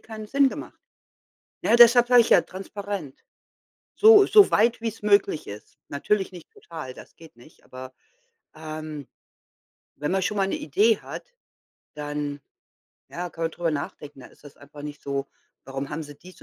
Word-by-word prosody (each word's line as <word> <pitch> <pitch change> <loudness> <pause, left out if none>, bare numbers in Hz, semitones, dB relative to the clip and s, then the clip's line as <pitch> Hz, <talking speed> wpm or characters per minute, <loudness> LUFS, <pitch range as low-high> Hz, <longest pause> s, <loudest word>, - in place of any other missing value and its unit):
keinen 220 -1 -9
Sinn 275 +5 +3
gemacht. - - -9 0.8
Ne, - - +3
deshalb 240 0 +7
sage 245 -1 +7
ich 230 - -2
ja - - +6
transparent, 195 -5 -7 0.7
so 425 -2 +7
so 415 -1 +6
weit 230 +2 +2
wie 230 - -1
's 220 -1 -14
möglich 200 -6 +2
ist. 105 +1 -11
Natürlich 190 +8 -1
nicht 175 -3 -13
total, 155 -7 -10
das - - -14
geht 160 -5 -17
nicht, 120 +7 -20
aber, 130 0 -11 0.6
ähm, 155 -2 -7 0.9
wenn 150 +2 -3
man 190 0 +1
schon 210 +3 -2
mal 195 -1 +1
'ne - - -2
Idee 210 +9 +2
hat, - - -10 0.6
dann, 145 -1 -5 0.7
ja 175 0 -6
kann 165 0 -5
man 165 - -1
drüber 170 -2 -2
nachdenken. 145 -1 -6
Da - - -12
ist - - -23
es 145 - -14
einfach 145 +1 -13
nicht 145 0 -8
so: 140 0 -3 0.4
„Warum 135 +1 -6
haben 160 +2 -5
sie 145 -1 -11
dies 180 +6 -16
165 Hz, 170 wpm, -24 LUFS, 145-210 Hz, 0.9 s, deshalb